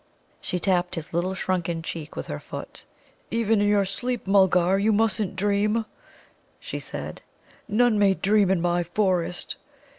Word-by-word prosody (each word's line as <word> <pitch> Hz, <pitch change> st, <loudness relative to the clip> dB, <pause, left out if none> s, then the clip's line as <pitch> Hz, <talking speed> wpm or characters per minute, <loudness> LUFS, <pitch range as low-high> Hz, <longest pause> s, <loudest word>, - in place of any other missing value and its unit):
She 180 Hz, -, -2 dB
tapped 180 Hz, -1 st, +1 dB
his 165 Hz, -1 st, -7 dB
little 180 Hz, +3 st, 0 dB
shrunken 175 Hz, -3 st, -2 dB
cheek 160 Hz, -2 st, -6 dB
with -, -, -4 dB
her 75 Hz, -, -5 dB
foot. -, -, -9 dB, 0.4 s
"Even 225 Hz, -2 st, +2 dB
in 205 Hz, -, +3 dB
your 205 Hz, -1 st, +3 dB
sleep, 245 Hz, +5 st, -3 dB
Mulgar, 190 Hz, -1 st, +4 dB
you 215 Hz, +2 st, +3 dB
mustn't 215 Hz, -2 st, +1 dB
dream," 205 Hz, +3 st, +1 dB, 0.7 s
she -, -, -5 dB
said. -, -, -6 dB, 0.5 s
"None 225 Hz, 0 st, +3 dB
may 195 Hz, -2 st, +4 dB
dream 200 Hz, 0 st, +3 dB
in 190 Hz, -3 st, +2 dB
my 175 Hz, 0 st, +1 dB
forest." 180 Hz, -1 st, -1 dB
195 Hz, 150 wpm, -25 LUFS, 175-210 Hz, 0.7 s, Mulgar